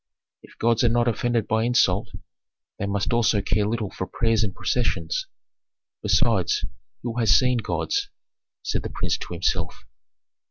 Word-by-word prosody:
"If - - -18
gods 115 0 +2
are 120 - +5
not 120 +1 +2
offended 120 0 0
by 110 +1 +1
insult, 115 -6 +2 0.7
they 100 - -1
must 100 +2 -1
also 115 -2 +3
care 100 +1 0
little 110 -2 -2
for 95 - -5
prayers 115 -1 +1
and 100 - 0
processions. 315 - -1 0.7
Besides, 420 0 +2 0.4
who 120 0 -3
has 110 -4 +5
seen 125 -2 +2
gods?" 405 - -1 0.5
said - - -1
the - - -5
prince - - -2
to - - -7
himself. - - -2
115 Hz, 150 wpm, -24 LUFS, 105-120 Hz, 0.7 s, are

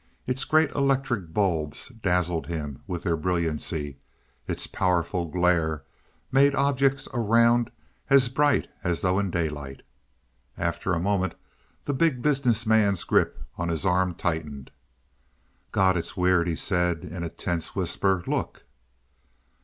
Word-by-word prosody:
Its 130 +1 -1
great 155 -1 +3
electric 135 - 0
bulbs 80 - 0
dazzled 90 -7 -1
him 75 -5 -5
with 90 -3 -4
their 85 -3 +1
brilliancy; 80 -4 -2 0.5
its - - -2
powerful 90 -1 0
glare 80 -3 +1 0.5
made 140 +1 +4
objects 140 0 +1
around 115 0 +3 0.4
as 135 -2 +6
bright 145 +2 +2 0.2
as 85 -2 -1
though 95 0 +2
in 100 -1 0
daylight. 75 -6 -3 0.7
After 85 +2 -1
a - - -1
moment 95 +1 0 0.5
the 145 - -2
Big 135 -3 +1
Business 125 -6 +2
Man's 105 -4 +3
grip - - +2 0.2
on 85 - -1
his 85 +2 -2
arm 90 -1 +2
tightened. 75 -6 -3 1.0
"God, 95 -1 +3
it's 85 +4 -3
weird!" 90 -1 +3
he 85 - 0
said 90 -1 0
in 90 0 -6
a 85 - -3
tense 85 -1 -4
whisper. 95 0 0
"Look!" - - -3
90 Hz, 130 wpm, -26 LUFS, 85-120 Hz, 1.0 s, as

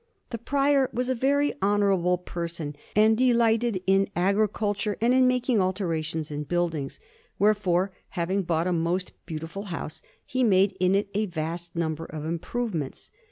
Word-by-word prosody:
The 230 - -4
Prior 275 +2 +2
was 250 +2 -2
a - - +3
very 280 +4 +2
honourable 195 -3 +2
person, 170 -4 -5 0.2
and 215 +1 +5
delighted 235 -4 +2
in 195 +1 +3
agriculture 205 +2 0
and 235 +2 +3
in 260 0 +5
making 250 -3 +2
alterations 165 -5 -2
in 145 0 -3
buildings; 165 -4 -2 0.4
wherefore, 195 -2 +2 0.3
having 185 +3 0
bought 170 -2 0
a 180 - +1
most 175 +2 -1 0.2
beautiful 165 +5 -6
house, 165 -4 -6 0.2
he 255 0 0
made 195 -3 +4
in 185 +1 +3
it 200 0 0
a 210 +1 0
vast 170 0 -5
number 165 -1 -2
of 155 -2 -7
improvements. 170 - -3
190 Hz, 150 wpm, -26 LUFS, 170-220 Hz, 0.4 s, and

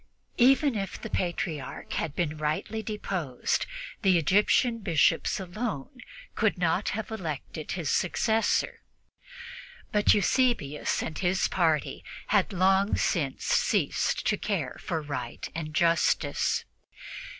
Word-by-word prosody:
Even 270 +3 +5
if 195 -3 -4
the - - -7
Patriarch 170 -5 -3
had 150 -3 -2
been 155 -3 -2
rightly 155 +9 -2
deposed, 190 - -2 0.3
the 190 -5 +4
Egyptian 210 - +3
Bishops 170 0 +2
alone 195 - -5 0.3
could 220 -4 +1
have 200 +6 0
elected 160 -6 -5
his 165 -5 -2
successor; 220 +4 +1 1.1
but 210 -1 +4
Eusebius 205 - +1
and 160 - -5
his 185 0 +2
party 160 -5 0 0.3
had 205 0 +3
long 190 +2 +3
since 145 -8 -1
ceased - - +1
to - - +2
care - - -2
for 160 -2 -3
right 140 -5 -5
or 165 - -2
justice. 165 +2 +1
180 Hz, 110 wpm, -28 LUFS, 155-210 Hz, 1.1 s, Even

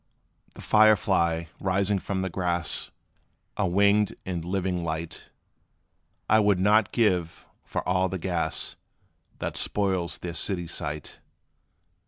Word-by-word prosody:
The - - -10
fire 110 0 +6
fly, 85 -5 0
rising 95 +1 +1
from 95 0 -3
the 95 - -2
grass 85 -2 0 0.7
A 100 - 0
winged 100 +3 +3
and 90 -3 -3
living 90 0 -2
light, 80 0 -5 1.0
I 110 - +5
would 100 -3 +3
not 105 +2 +3
give 90 -8 0 0.2
for - - -4
all 90 +1 +2
the 95 - -3
gas, 85 -3 -3 0.6
That - - -4
spoils 95 -4 0
their 85 -1 -6
city 90 0 -1
sight. 75 -2 -6
95 Hz, 125 wpm, -26 LUFS, 85-100 Hz, 1.0 s, fire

